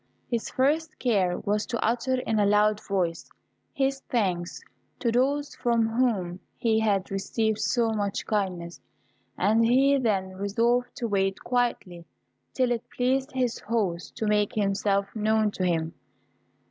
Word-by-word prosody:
His 235 -2 -1
first 305 +4 0
care 195 -8 +1
was 210 +1 -1
to 235 -2 -2
utter 245 +3 +1
in 220 -3 0
a 205 - +4
loud 210 +1 +3
voice 180 -4 -1 0.4
his 270 0 0
thanks 185 -7 -1 0.4
to 235 - 0
those 280 +4 +1
from 235 -2 +1
whom 215 -7 0 0.2
he 220 -2 +2
had 200 -4 0
received 215 +2 -1
so 235 -2 +1
much 205 -2 -2
kindness, 180 -5 -2 0.6
and 220 +2 +3
he 270 +4 +4
then 200 -6 0
resolved 230 +5 0
to 240 - -3
wait 195 -2 0
quietly 235 -9 -1 0.4
till 255 -2 +1
it 240 0 -3
pleased 265 +3 0
his 250 -3 -1
host 200 -6 -2
to 220 - -3
make 210 -1 +1
himself 200 -1 0
known 215 0 +2
to 185 - -4
him. 165 -2 0
220 Hz, 145 wpm, -26 LUFS, 195-245 Hz, 0.6 s, a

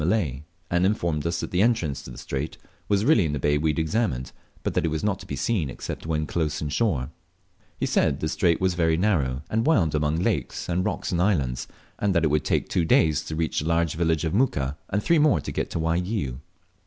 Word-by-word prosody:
Malay, 80 - 0 0.3
and 85 +1 +2
informed 85 -6 0
us 85 0 -1
that - - -5
the 90 - +2
entrance 100 - +1
to - - -10
the 60 - -10
strait 70 +3 -4 0.3
was 100 +1 +2
really 135 - +5
in 75 -3 -1
the - - -1
bay 75 +2 +2
we 80 +1 +1
had 75 - -1
examined, 80 - -1 0.3
but - - -1
that - - +1
it - - +1
was 80 0 -2
not 100 -2 0
to - - -11
be - - -3
seen 95 -12 0
except 65 - -6
when 75 -1 0
close 80 -2 -1
inshore. 75 - 0 0.7
He - - +1
said 70 - +2
the 80 - -1
strait 85 0 +2
was 95 -1 +2
often - - -9
very 80 -2 +3
narrow, 75 -9 +1
and 110 +1 0
wound 95 - +3
among 75 0 +1
lakes 85 - -1
and 90 +1 0
rocks - - -2
and 85 -1 +1
islands, 70 -11 0 0.3
and 100 -2 +1
that 85 - +3
it 80 - +2
would 75 0 +2
take - - +1
two 90 - +1
days 80 -1 +3
to 80 - -4
reach 80 0 0
the 75 - -3
large 85 -1 +1
village 80 0 +1
of 80 - -1
Muka, 70 - +1
and 100 +2 -1
three 170 -1 +4
more 150 - +4
to - - -5
get - - -2
to - - -3
Waigiou. 85 - -1
80 Hz, 240 wpm, -25 LUFS, 75-95 Hz, 0.7 s, really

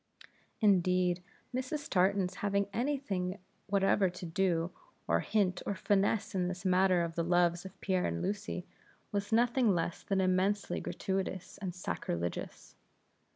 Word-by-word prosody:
Indeed, 180 -3 +3 0.3
Mrs. 260 +4 -3
Tartan's 190 0 +2
having 200 0 +1
any 275 +5 +1
thing 190 -8 -3 0.3
whatever 195 -1 +3
to 180 0 -8
do, 170 0 +1 0.4
or 85 +2 +3
hint, 185 - +1
or 200 - -2
finesse 200 +2 +1
in 180 -2 +1
this 180 +1 -5
matter 185 -1 +4
of 165 -1 -3
the 170 - -1
loves 175 +1 +2
of 190 - -10
Pierre 185 -2 +1
and 85 0 -2
Lucy, 195 -3 -3 0.5
was 200 +1 -2
nothing 235 -2 +3
less 165 0 -2
than 195 -1 0
immensely 190 +2 +1
gratuitous 190 -1 -3
and 185 -3 -4
sacrilegious. 85 - -4
190 Hz, 140 wpm, -32 LUFS, 180-200 Hz, 0.5 s, matter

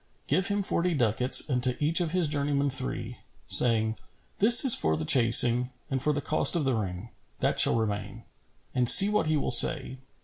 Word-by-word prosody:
Give 180 +7 -2
him 200 0 -4
forty 175 -2 -4
ducats 125 0 +2
and 125 -4 -4
to 125 -1 -2
each 160 +4 -1
of 170 - -5
his 180 -2 -2
journeymen 145 -1 -4
three, - - -7 0.3
saying, 110 -2 +3 0.4
"This 235 +6 +6
is 255 - +8
for 80 0 -2
the 80 - -8
chasing, 120 - +3 0.2
and 135 -1 -5
for 150 - -2
the 145 -1 -6
cost 155 - -1
of 160 -4 -4
the 135 - -3
ring, 100 -1 -8 0.3
that - - -4
shall - - +2
remain.' 105 -3 -7 0.5
And 125 -2 +2
see 200 +1 +8
what 210 -6 -3
he 155 0 -3
will - - -5
say. 140 -5 -3
135 Hz, 195 wpm, -24 LUFS, 115-160 Hz, 0.5 s, is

